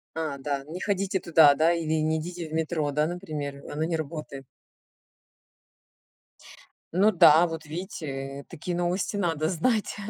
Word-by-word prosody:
А, 155 -4 -3
да, 140 0 -3
не 175 +4 -6
ходите 195 -1 0
туда, 160 -4 +6
да, 160 +4 +3
или 160 -2 0
не 160 +1 +1
идите 170 0 -6
в - - -10
метро, 160 -2 -1
да, 150 +2 +1
например, 150 -5 -5
оно 155 +2 -2
не 165 0 -1
работает. 150 -3 -6 2.5
Ну 200 +4 +4
да, 165 -2 +7
вот 165 -2 -5
видите, 140 -5 -6
такие 175 +3 -5
новости 175 +3 -1
надо 165 -5 0
знать. 210 +5 0
160 Hz, 145 wpm, -26 LUFS, 150-175 Hz, 2.5 s, да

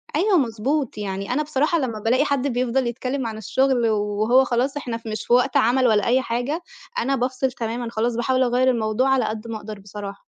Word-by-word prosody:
أيوه 375 +3 +3
مضبوط، 255 +1 -1
يعني 195 +2 -3
أنا 300 +3 +1
بصراحة 305 +3 +1
لمّا 230 -6 -3
بالاقي 250 +7 +2
حد 280 -1 0
بيفْضل 250 0 0
يتكلّم 255 +1 -3
عن 220 -1 -5
الشغل 245 +2 +1
وهو 215 +4 +2
خلاص 260 +3 0
إحنا 235 -5 -4
مش 215 0 -4
في 240 - +1
وقت 250 +1 +3
عمل 250 +2 +3
ولا 210 -3 +3
أي 255 +2 +3
حاجة، 250 +8 -2 0.4
أنا 270 +3 +1
بافصل 255 +1 -1
تمامًا 235 0 -4
خلاص 230 +1 -1
باحاول 255 +2 +1
أغيّر 250 +1 +2
الموضوع 230 +2 +1
على 265 -1 +3
قد 220 +1 -4
ما 225 -1 -4
أقدر 210 -1 -8
بصراحة. 200 0 -8
245 Hz, 195 wpm, -22 LUFS, 220-265 Hz, 0.4 s, أيوه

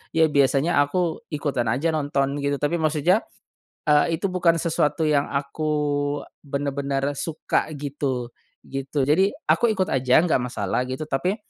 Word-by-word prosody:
Ya 160 0 +5
biasanya 145 +1 +3
aku 165 +5 -1
ikutan 145 -6 -1
aja 155 +7 0
nonton 140 -2 0
gitu, 140 0 0
tapi 145 +3 0
maksudnya, 155 +6 +2 0.7
eee, 150 +3 +4
itu 195 - -1
bukan 180 -2 +3
sesuatu 160 -2 0
yang 150 -2 +2
aku 150 +2 -2 0.7
bener-bener 140 0 -1
suka 160 -2 -1
gitu, 140 -4 -3 0.3
gitu. 135 +1 -3
Jadi 165 +9 +3 0.2
aku 240 - +4
ikut 195 -5 0
aja 130 +3 +4
nggak 175 -5 +2
masalah 125 -1 -2
gitu 130 +3 -5
tapi, 180 +9 0
145 Hz, 140 wpm, -24 LUFS, 135-160 Hz, 0.7 s, Ya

